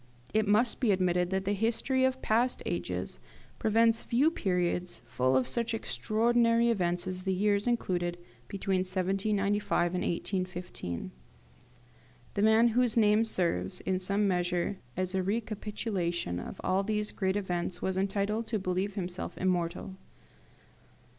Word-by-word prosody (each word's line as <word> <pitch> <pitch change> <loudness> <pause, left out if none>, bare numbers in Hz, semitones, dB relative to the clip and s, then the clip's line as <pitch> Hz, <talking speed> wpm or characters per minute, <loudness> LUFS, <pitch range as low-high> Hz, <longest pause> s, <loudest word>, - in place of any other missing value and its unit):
It 215 -1 +2
must 215 +4 +3
be 245 - +1
admitted 180 -2 +2
that 190 +1 -1
the 200 - +1
history 230 +5 +1
of 260 0 -1
past 240 +3 +1
ages 90 -3 -3 0.4
presents 225 +1 +3
few 275 +7 +2
periods 180 - -1
full 130 +2 +1
of 130 - +1
such 235 -1 -1
extraordinary 230 +1 +2
events 175 -5 0
as 185 0 -4
the 190 +1 -1
years 205 +3 +1
included 175 -7 0 0.3
between 195 -1 -1
1795 195 0 0
and 180 - -1
1815. 175 - -4 1.2
The 200 - -1
man 220 +2 +5
whose 240 0 +2
name 215 0 +5
serves, 170 - 0
in 185 -1 -1
some 200 +2 +1
measure, 180 +1 0 0.2
as 185 0 -1
a 190 - +1
recapitulation 200 - -2
of - - -8
all 190 +1 +2
these 210 +1 -1
great 190 -1 -1
events 180 -3 -2
was 190 - 0
entitled 200 +3 -1
to 220 - 0
believe 190 +1 -2
himself 180 -2 -4
immortal. 185 +1 -1
195 Hz, 135 wpm, -30 LUFS, 180-220 Hz, 1.2 s, man